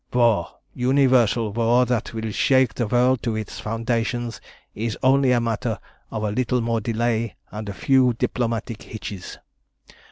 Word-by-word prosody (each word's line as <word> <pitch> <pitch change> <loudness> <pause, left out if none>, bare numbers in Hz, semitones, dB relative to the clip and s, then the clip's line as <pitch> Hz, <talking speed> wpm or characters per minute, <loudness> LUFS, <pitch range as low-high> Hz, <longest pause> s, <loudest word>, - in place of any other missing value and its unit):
"War 115 -8 +3 0.3
universal 125 -4 +3
war 120 +2 +3
that 125 -2 -1
will 110 -1 -4
shake 130 +4 +3
the 120 - -2
world 125 +2 +3
to 115 -2 -2
its 110 -2 -5
foundations 115 +1 -2 0.3
is 110 0 -3
only 135 0 +4
a 125 - +4
matter 115 -2 -1 0.3
of 110 -1 -4
a 105 - 0
little 125 +2 0
more 115 -1 0
delay 115 0 -1 0.2
and 105 -1 -6
a - - -4
few 130 +4 +3
diplomatic 115 -1 -2
hitches. 100 -4 -8
115 Hz, 150 wpm, -23 LUFS, 110-125 Hz, 0.3 s, only